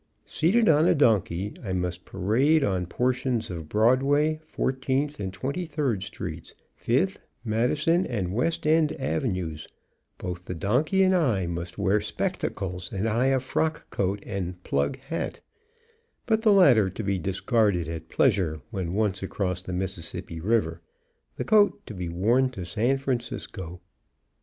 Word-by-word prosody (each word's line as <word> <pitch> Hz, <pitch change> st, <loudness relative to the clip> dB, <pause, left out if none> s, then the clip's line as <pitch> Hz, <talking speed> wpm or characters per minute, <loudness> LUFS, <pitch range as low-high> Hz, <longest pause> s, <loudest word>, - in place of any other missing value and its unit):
Seated 210 Hz, +8 st, +2 dB
on 155 Hz, +2 st, +5 dB
a -, -, +4 dB
donkey, 105 Hz, -, +2 dB
I 95 Hz, -, -3 dB
must 90 Hz, -1 st, -3 dB
parade 130 Hz, -, +2 dB
on 95 Hz, -7 st, 0 dB
portions 125 Hz, 0 st, 0 dB
of 80 Hz, -3 st, -6 dB
Broadway, 135 Hz, +8 st, +3 dB
Fourteenth 135 Hz, -1 st, -1 dB
and 95 Hz, -2 st, -3 dB
Twenty 140 Hz, -, -3 dB
third 140 Hz, -, -1 dB
Streets, -, -, -7 dB, 0.2 s
Fifth, -, -, 0 dB, 0.3 s
Madison, 125 Hz, +10 st, +1 dB
and 95 Hz, -7 st, -2 dB
West 160 Hz, +10 st, 0 dB
End 155 Hz, 0 st, +3 dB
Avenues; 90 Hz, -, -2 dB, 0.5 s
both 90 Hz, 0 st, -6 dB
the 90 Hz, -, -5 dB
donkey 135 Hz, -, +2 dB
and 190 Hz, 0 st, +4 dB
I 120 Hz, -, +2 dB
must 85 Hz, +1 st, -5 dB
wear 100 Hz, +2 st, +2 dB
spectacles, 90 Hz, -2 st, -3 dB
and 100 Hz, +3 st, -1 dB
I 115 Hz, +4 st, +2 dB
a 135 Hz, 0 st, +3 dB
frock 155 Hz, +4 st, -2 dB
coat 100 Hz, +1 st, -1 dB
and 90 Hz, -3 st, -5 dB
"plug" 70 Hz, -, 0 dB
hat, 135 Hz, +5 st, -4 dB, 0.9 s
but, 220 Hz, -1 st, +2 dB
the 220 Hz, -2 st, +5 dB
latter 130 Hz, -, +6 dB
to 100 Hz, +4 st, -6 dB
be 100 Hz, -1 st, 0 dB
discarded 100 Hz, -, +1 dB
at 80 Hz, 0 st, -6 dB
pleasure 95 Hz, -, +2 dB
when 95 Hz, -4 st, -3 dB
once 105 Hz, -2 st, 0 dB
across 95 Hz, -1 st, -2 dB
the 95 Hz, -, -7 dB
Mississippi 90 Hz, -3 st, -4 dB
River, 85 Hz, -4 st, 0 dB, 0.5 s
the -, -, -4 dB
coat 210 Hz, -1 st, +3 dB
to -, -, -8 dB
be 90 Hz, -3 st, -4 dB
worn 115 Hz, +10 st, +2 dB
to 95 Hz, -7 st, -6 dB
San 115 Hz, +9 st, +1 dB
Francisco. 120 Hz, -9 st, -4 dB
110 Hz, 145 wpm, -26 LUFS, 90-135 Hz, 0.9 s, latter